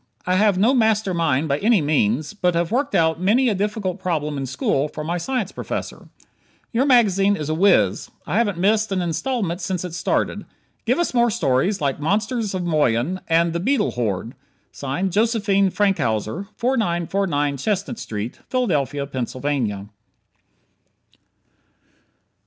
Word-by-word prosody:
I 180 - +1
have 200 0 +3
no 220 +7 +4
master 220 -5 +2
mind 160 -3 +1
by 140 0 0
any 220 0 +3
means, 145 - 0
but 180 -4 0
have 170 +2 0
worked 275 +4 0
out 160 0 +2
many 235 +7 +3
a - - +1
difficult 200 -1 -2
problem 155 -5 -2
in 135 -1 -3
school 135 +2 0
for 150 0 -7
my 170 +3 -2
science 230 +1 -2
prof. - - -4 0.8
Your 255 +5 +2
magazine 205 -6 +4
is 155 -5 -5
a - - +1
wiz. 195 +5 +3 0.2
I - - -1
haven't 205 -6 0
missed 210 +3 +2
an 190 - 0
instalment 175 +2 -2
since 180 0 -2
it 175 - -7
started. 175 - -1 0.4
Give - - +3
us 345 -5 0
more 240 -1 +3
stories 175 - +1
like 140 -1 -1
"Monsters 210 - -1
of 185 - -2
Moyen," 155 0 +1
and 165 0 +2
"The 170 - -1
Beetle 265 +10 +1
Horde." 115 -1 -3 0.4
Josephine 195 - +1
Frankhouser, 185 - 0
4949 175 - 0
Chestnut 200 - -2
St., 105 +2 -5
Philadelphia, 145 - 0
Pennsylvania. 130 -5 -3
180 Hz, 145 wpm, -22 LUFS, 145-210 Hz, 0.8 s, no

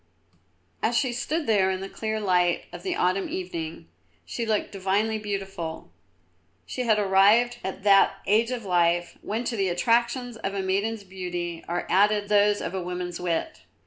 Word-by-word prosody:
As 235 +1 +1
she 250 +1 +1
stood 300 +6 -2
there 200 -5 +3
in 190 -1 -1
the 195 - -5
clear 220 +1 -3
light 180 -4 +2
of - - -7
the 370 -2 -2
autumn 185 +2 0
evening, 165 - -5 0.4
she 230 -2 -4
looked 215 -2 0
divinely 200 +3 0
beautiful. 195 -5 -5 0.7
She 250 - -4
had 220 -2 +4
arrived 210 +5 +4
at 190 0 -5
that 200 -1 +5
age 220 +3 +3
of 245 -4 -4
life, 175 -1 +1
when 220 +3 -3
to 240 -1 -2
the 195 -3 +1
attractions 235 +5 +1
of 195 -2 -4
a 195 - -1
maiden's 200 +3 -1
beauty 180 -3 -5
are 175 +1 -2
added 205 +1 +3
those 205 0 +4
of 170 - -4
a 190 - -2
woman's 180 0 -4
wit. 180 - -2
195 Hz, 170 wpm, -26 LUFS, 180-225 Hz, 0.7 s, that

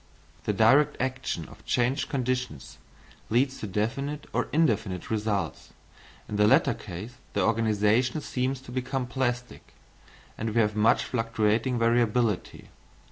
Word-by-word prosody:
The - - +2
direct 135 +8 +4
action 130 -10 -2
of - - -15
changed 125 +4 0
conditions 125 - -3 0.5
leads 130 +4 +1
to 110 - -4
definite 135 +9 -2
or - - 0
indefinite 110 - 0
results. 105 -2 -2 0.5
In 105 - -4
the 105 0 +5
latter - - +4
case 105 +8 -8 0.2
the - - +1
organisation 115 +4 +2
seems 130 0 -2
to 130 - -11
become 130 +1 -2
plastic, 125 -1 -3 0.6
and 110 - -1
we - - +4
have 105 -1 +2
much 110 +1 +4
fluctuating 115 +1 0
variability. 115 -2 +1
120 Hz, 130 wpm, -27 LUFS, 105-130 Hz, 0.6 s, the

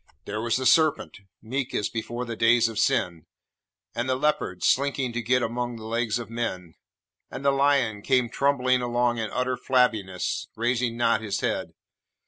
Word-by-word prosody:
There 105 +1 -4
was 115 +1 0
the 130 - -3
serpent, 155 0 +3 0.2
meek 130 +3 -3
as 105 - 0
before 120 +2 -4
the 115 -1 -5
days 115 +1 +4
of 115 -2 -4
sin, 85 -3 0 0.7
and 120 +2 -2
the 130 - +2
leopard 130 -10 -1
slinking 135 -2 +1
to 120 - -2
get 125 +2 +1
among 120 +1 -3
the 110 -1 -9
legs 115 0 -1
of 120 - -6
men, 100 -8 -4 0.6
and 140 - -7
the 140 - +5
lion 135 -6 +2
came 125 +1 +2
trundling 130 0 +1
along 120 -1 0
in 110 -1 -2
utter 125 +2 -1
flabbiness, 110 -9 0
raising 120 0 0
not 115 -2 +2
his 105 -3 -3
head. - - -2
120 Hz, 170 wpm, -25 LUFS, 110-130 Hz, 0.7 s, the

